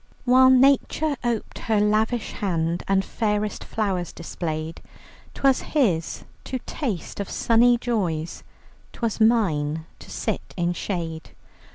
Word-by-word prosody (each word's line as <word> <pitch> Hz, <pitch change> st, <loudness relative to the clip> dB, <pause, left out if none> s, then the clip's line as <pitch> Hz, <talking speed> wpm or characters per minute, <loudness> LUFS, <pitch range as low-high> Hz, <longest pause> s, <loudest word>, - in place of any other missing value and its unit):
"While 260 Hz, +1 st, +6 dB
Nature 275 Hz, +3 st, +4 dB
op'ed 235 Hz, -3 st, -3 dB
her 220 Hz, -2 st, +2 dB
lavish 215 Hz, +2 st, +1 dB
hand 170 Hz, -3 st, -1 dB
And 195 Hz, 0 st, +2 dB
fairest 210 Hz, -2 st, -1 dB
flowers 190 Hz, -6 st, -2 dB
displayed, 160 Hz, -1 st, -5 dB, 0.5 s
'Twas 270 Hz, -2 st, +3 dB
his 195 Hz, -, 0 dB, 0.2 s
to 260 Hz, -, -3 dB
taste 225 Hz, -, -4 dB
of 200 Hz, -, -3 dB
sunny 240 Hz, +1 st, +4 dB
joys, 180 Hz, -10 st, -2 dB, 0.5 s
'Twas 230 Hz, -2 st, -2 dB
mine 160 Hz, -9 st, +2 dB
to -, -, -13 dB
sit -, -, -4 dB
in 175 Hz, 0 st, +1 dB
shade. 165 Hz, -3 st, -5 dB
210 Hz, 115 wpm, -24 LUFS, 170-240 Hz, 0.5 s, While